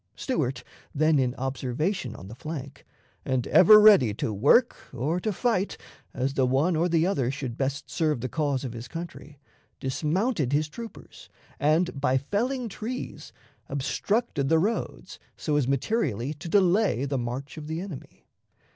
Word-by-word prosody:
Stuart, 140 - -2 0.3
then 155 0 +3
in 125 -2 0
observation 135 - -2
on 95 - -10
the 105 - -9
flank, 140 +1 -8 0.4
and 130 -2 -1
ever 210 +3 +8
ready 195 - +6
to 110 - -2
work 145 - +4 0.2
or 155 +9 -1
to 215 +4 -1
fight 205 -1 0 0.3
as 135 +2 -2
the 130 -2 +2
one 145 +7 +2
or 170 +3 +1
the 165 -1 +3
other 140 -10 0
should 130 -3 -4
best 140 +3 -2
serve 155 -5 0
the 130 - -2
cause 140 -2 -1
of 125 -3 -5
his 115 0 -7
country, 165 -3 -8 0.4
dismounted 155 - -1
his 150 +1 +2
troopers, 230 +6 -11 0.3
and, 155 0 +1
by 130 -2 +3
felling 240 - -1
trees, 225 +4 -6 0.4
obstructed 145 - -1
the 160 - +5
roads 205 +8 -2 0.2
so 150 - -1
as 145 -4 +2
materially 140 - -1
to 160 +3 -9
delay 190 - +3
the 140 -1 -1
march 125 +4 -5
of 155 -2 -8
the 160 +1 -3
enemy. 180 -7 -9
150 Hz, 155 wpm, -26 LUFS, 130-185 Hz, 0.4 s, ever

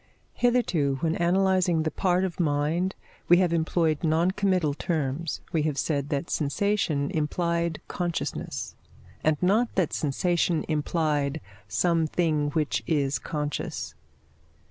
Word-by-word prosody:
Hitherto, 175 - +2
when 160 -1 +1
analysing 180 -1 +2
the 155 - -1
part 180 +3 +1
of 185 -2 -3
mind, 160 +4 0 0.3
we 175 - +7
have 180 -2 +2
employed 160 -1 +1
non 165 +3 +2
committal 185 -7 +1
terms: 155 0 -2
we 160 - +1
have 150 -2 -1
said 145 -1 -1
that 145 +4 -2
sensation 155 -2 0
implied 170 +1 -1
consciousness, 175 -2 -3 0.5
and 155 -1 +3
not 215 +6 +2
that 185 -5 +1
sensation 170 +3 0
implied 150 -1 0 0.3
something 155 - +1
which 150 0 0
is 145 -4 +1
conscious. 145 - -4
160 Hz, 120 wpm, -26 LUFS, 150-175 Hz, 0.5 s, we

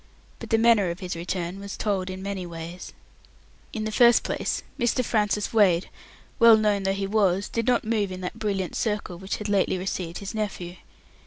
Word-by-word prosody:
But - - -8
the 225 - +3
manner 225 -5 +4
of 170 +1 -5
his 180 -2 -4
return 175 +2 -4
was 200 0 -7
told 195 -3 -1
in 185 0 -6
many 200 -2 -3
ways. 170 +1 -8 0.8
In 220 - -4
the 215 - -2
first 235 +1 +5
place, - - -2 0.2
Mr. 240 +1 +1
Francis 210 -1 0
Wade, 190 -6 +3 0.5
well 230 -2 +8
known 210 -2 +1
though 195 0 0
he 195 0 -2
was, 195 -1 +1
did 230 0 -3
not 245 -1 +3
move 215 -3 0
in 185 0 -6
that 180 - -5
brilliant 195 -4 -2
circle 210 -5 -2
which 190 +1 -3
had 210 - -5
lately 200 -2 +1
received 180 -2 -4
his 200 +1 -6
nephew. 185 -5 -4
200 Hz, 190 wpm, -25 LUFS, 185-215 Hz, 0.8 s, well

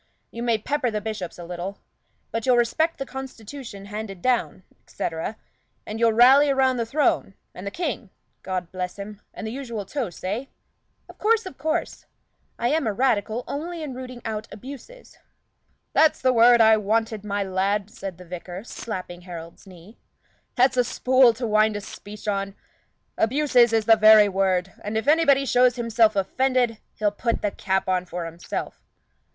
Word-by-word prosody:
You 235 - -7
may 235 -2 +2
pepper 260 +3 -1
the 215 -2 -2
bishops 210 -5 -5
a 175 - -8
little. 180 +3 -6 0.5
But 230 +2 -3
you'll 250 -1 +5
respect 315 +8 +1
the 270 - -4
constitution 255 -5 -8
handed 205 -2 -6
down, 240 -3 0 0.2
etc. 165 +6 -4 0.5
and 215 +1 -6
you'll 230 -1 +4
rally 265 +5 +6
round 260 -2 +2
the 230 - -1
throne 260 -7 +1 0.2
and 185 +2 -8
the - - 0
King, 265 - -4 0.3
God 185 -2 -4
bless 180 0 -4
him, 205 +1 -8
and 225 - -8
the 220 - -4
usual 235 -5 -5
toasts, 225 - -5
eh?" 210 +8 -2 0.6
"Of - - -15
course, 450 0 +2
of 325 -8 -9
course. 315 +3 -2 0.5
I 240 - 0
am 305 -2 +1
a 215 - 0
Radical 235 -1 0
only 330 +3 -5
in 285 -4 -5
rooting 255 -1 -8
out 215 -1 -4
abuses." 280 - -11 0.7
"That's 315 -1 +4
the 255 0 +2
word 235 0 +6
I 220 0 +6
wanted, 220 0 -1
my 205 -1 -1
lad!" 195 +2 -1
said 190 -3 -7
the 180 - -12
vicar, 180 +2 -7
slapping 185 -7 -7
Harold's 170 +1 -10
knee. 185 +4 -15 0.6
"That's 255 0 +3
a 250 - +5
spool 255 0 +4
to 240 +2 -4
wind 215 -1 +3
a 205 - -3
speech 205 +2 -10
on. 195 -1 -2 0.6
Abuses 250 -1 +4
is 225 -1 +1
the 225 0 +7
very 215 -1 +8
word; 190 -1 0
and 210 +2 -2
if 220 - -3
anybody 290 -3 +4
shows 250 -1 +4
himself 230 -2 +2
offended, 245 +3 +1 0.2
he'll 210 -1 +1
put 230 +3 -2
the 205 - +1
cap 190 -1 -1
on 185 -1 0
for 175 -1 -5
himself." 165 +1 -6
220 Hz, 170 wpm, -24 LUFS, 195-255 Hz, 0.7 s, very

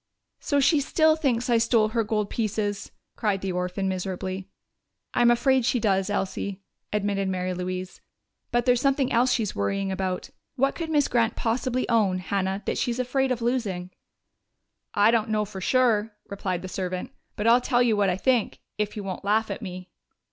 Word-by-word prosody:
"So 285 - +1
she 285 +3 +4
still 315 +2 +3
thinks 255 -7 0
I 235 -2 +3
stole 225 -1 +3
her 230 0 0
gold 210 -1 -1
pieces!" 210 -2 -2 0.2
cried 205 -3 0
the 195 - -2
orphan 180 +2 -2
miserably. 190 0 -4 0.6
"I'm 240 0 +4
afraid 260 +2 +3
she 245 +1 +1
does, 195 -4 +1
Elsie," 195 +1 -3 0.3
admitted 200 -1 0
Mary 185 0 -2
Louise. 185 +1 -5 0.5
"But 240 0 +1
there's 250 -1 +3
something 275 -1 +2
else 245 +2 +3
she's 220 -5 0
worrying 195 - -1
about. 190 -1 -3 0.2
What 275 +1 +2
could 330 -2 -5
Miss 295 -3 +3
Grant 230 -2 +1
possibly 250 +2 -1
own, 210 -6 +2
Hannah, 190 +2 -2
that - - -1
she's 240 -2 -1
afraid 260 +1 0
of 240 -2 -1
losing?" 200 -8 -1 1.0
"I 205 +2 +5
don't 225 -1 +1
know 215 -1 +1
for 195 -2 -8
sure," 225 -2 +2
replied 190 -3 -3
the - - -4
servant. 185 +5 -4 0.2
"But 210 - -3
I'll 235 +2 +6
tell 245 -1 +2
you 230 -3 +3
what 200 -2 +2
I 180 - 0
think 245 0 +1 0.2
if 210 0 -2
you 205 - -4
won't 190 0 -5
laugh 215 +2 +1
at - - -5
me." 185 -3 -8
210 Hz, 180 wpm, -26 LUFS, 190-245 Hz, 1.0 s, I'll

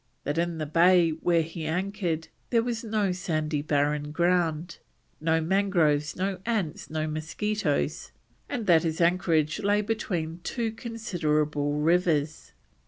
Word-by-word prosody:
That 145 +3 -1
in 170 -1 -1
the 155 - -2
bay 170 +2 +4
where 165 +1 +1
he 160 0 -6
anchored 180 -1 -2 0.2
there 230 -2 +3
was 235 -1 -3
no 210 -3 0
sandy 155 -4 -1
barren 150 0 0
ground, 170 -1 0 0.4
no 160 +1 +2
mangroves, 165 -5 +2
no 190 0 -2
ants, 205 -5 -2
no 155 0 -2
mosquitoes, 155 +8 -2 0.4
and 245 -6 -3
that 170 -4 +5
his 160 -1 -2
anchorage 170 -2 +2
lay 205 +1 +2
between 180 -7 -3
two 230 +3 -2
considerable 155 -11 -1
rivers. 155 -1 +1
170 Hz, 130 wpm, -27 LUFS, 155-195 Hz, 0.4 s, that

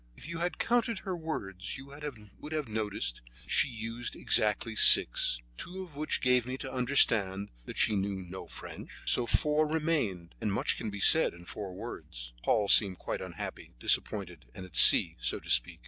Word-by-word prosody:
"If - - -11
you 170 0 -7
had 175 +1 -3
counted 235 -1 -1
her 190 -2 -5
words 100 - -6
you 135 - -11
would 140 +2 -14 0.5
have 155 -3 -4
noticed 105 - -4 0.2
that - - -13
she - - +4
used 115 0 -7
exactly 110 +1 +1
six, 60 - +7 0.2
two 185 +2 -6
of 170 -6 -15
which 155 +1 -3
gave 125 -2 +1
me 130 +1 -5
to 135 -1 -7
understand 110 -7 +1 0.2
that - - -10
she 110 - +2
knew 100 0 -3
no 95 0 -10
French, - - -9 0.2
so 120 - +2
four 150 +3 +1
remained, 150 - -3
and 105 - -2
much 100 - -1
can 110 - -6
be 100 0 -8
said 160 - +4
in 85 0 -15
four 95 0 -8
words." - - -10
Paul 105 - 0
seemed 100 -3 +6
quite - - -6
unhappy, - - -9
disappointed, 90 - -1
and 95 - -9
at 90 - -14
sea, - - +7
so - - -1
to - - -5
speak. 60 0 +1
110 Hz, 185 wpm, -29 LUFS, 95-150 Hz, 0.5 s, six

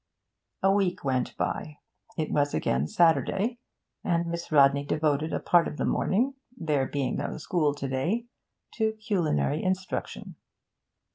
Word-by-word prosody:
A 195 - +5
week 195 -3 +1
went 130 -2 -1
by; 150 -1 -3 0.4
it 155 - -2
was 145 -1 +1
again 65 +4 0
Saturday, 175 - +2 0.4
and 170 -2 +1
Miss 170 0 -5
Rodney 140 -1 +5
devoted 150 +1 0
a - - -1
part 175 -1 +3
of 150 - -6
the - - -1
morning 250 +8 +1 0.2
(there 150 -5 0
being 140 -3 -2
no - - -3
school 155 -2 0
to 140 -1 -4
day) 170 - -1 0.5
to 220 -1 +1
culinary 175 - 0
instruction. 185 0 -3
160 Hz, 140 wpm, -27 LUFS, 140-190 Hz, 0.5 s, A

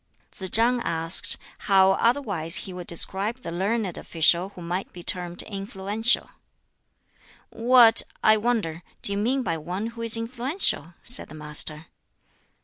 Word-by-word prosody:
Tsz 190 -1 -7
chang 240 +4 +1
asked 165 -4 +3 0.3
how 190 -1 +5
otherwise 200 - 0
he 190 - -8
would 180 -1 -9
describe 200 +8 -3
the - - -6
learned 195 +1 -2
official 170 +3 +1
who 185 - -13
might 180 +3 -4
be 175 - -11
termed 175 -1 -4
influential. 200 +3 -1 1.2
"What, 235 -1 +6 0.2
I 215 - +6
wonder, 215 -8 -2 0.2
do - - +2
you 200 - -1
mean 255 +5 0
by 165 -7 -3
one 180 +7 -5
who 230 - -9
is 230 0 +2
influential?" 235 - -2
said 245 - +2
the 155 - -11
Master. 150 0 -1
195 Hz, 140 wpm, -24 LUFS, 175-230 Hz, 1.2 s, What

